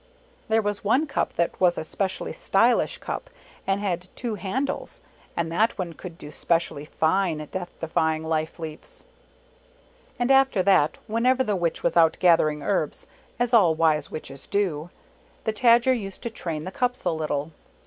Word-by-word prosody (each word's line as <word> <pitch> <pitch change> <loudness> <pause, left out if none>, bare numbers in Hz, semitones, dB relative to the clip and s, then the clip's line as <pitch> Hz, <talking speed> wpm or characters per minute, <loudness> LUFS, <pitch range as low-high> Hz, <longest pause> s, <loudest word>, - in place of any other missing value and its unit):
There 220 0 +2
was 205 -1 -2
one 250 +9 +3
cup 280 - -1
that 170 +2 -1
was 175 -2 +4
a - - -2
specially 190 +4 -3
stylish - - +2
cup - - -5 0.4
and 195 0 +1
had 180 -3 -2
two 235 -3 -3
handles, 235 +7 -3 0.3
and 165 -1 -1
that 215 +7 +2
one 180 -4 -3
could 170 0 -10
do 150 - -10
specially 165 -4 -1
fine 165 +2 +1
Death 180 -2 -6
defy 160 -1 +1
ing 155 - -6
life 160 0 -2
leaps. 160 - -8 1.1
And 245 +2 +1
after 270 -7 +4
that, 180 -6 +3
whenever 250 +4 +2
the 210 -4 0
Witch 170 -3 -1
was 170 0 +1
out 165 -1 +5
gathering 155 -4 +3
herbs, 185 -7 -1 0.3
as 245 0 0
all 180 -9 +6
wise 155 -1 +2
Witches 135 -3 -8
do, 175 -6 -1 0.5
the 220 - -1
Tajer 235 +3 +5
used 195 -6 -5
to 235 - -3
train 165 -8 -4
the 185 - -6
cups 250 +2 -1
a - - +2
little. 155 -1 -2
185 Hz, 170 wpm, -25 LUFS, 160-225 Hz, 1.1 s, all